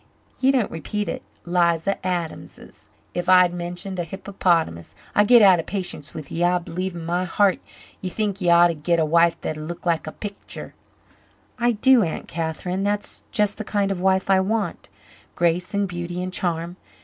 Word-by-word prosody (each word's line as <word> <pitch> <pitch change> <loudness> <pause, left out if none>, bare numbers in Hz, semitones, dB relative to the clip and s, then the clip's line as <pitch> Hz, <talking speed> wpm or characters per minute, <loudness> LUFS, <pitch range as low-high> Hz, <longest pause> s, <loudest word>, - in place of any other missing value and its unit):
Ye 265 - +3
needn't 260 -6 +2
repeat 205 +6 -3
it 255 - -4 0.2
'Liza... 175 +2 +1
Adams 175 -3 -3
's - - -14 0.3
if 175 +1 -2
I'd 180 -1 +6
mentioned 175 +2 -5
a - - 0
hippopotamus. 165 - -1 0.2
I 205 - +5
git 235 +1 +7
out 190 -3 +7
of 165 - -5
patience 180 -6 -4
with 155 -3 -8
ye. 170 - -1
I 180 +1 +3
b'lieve 180 +1 -4
in 165 -1 -6
my 175 +2 0
heart 195 +1 +2 0.4
ye 185 - -3
think 200 0 -2
ye 175 - +2
ought 170 0 +7
to - - 0
git 165 +2 0
a 160 - +3
wife 170 +2 +3
that'd 155 0 -4
look 170 +3 -7
like 165 -2 0
a - - -4
picter." 205 +3 -8 0.9
"I 240 0 +3
do, 255 +3 +5
Aunt 165 -5 -3
Catherine. 170 +3 -3
That's 205 +1 -2
just 210 0 0
the - - -2
kind 200 -1 0
of 190 - -2
wife 190 0 +2
I 190 - +5
want 210 +2 -2 0.5
grace 175 +2 +1
and 200 0 +1
beauty 175 0 -4
and 185 0 -5
charm. 175 -1 -2
180 Hz, 190 wpm, -23 LUFS, 170-200 Hz, 0.9 s, git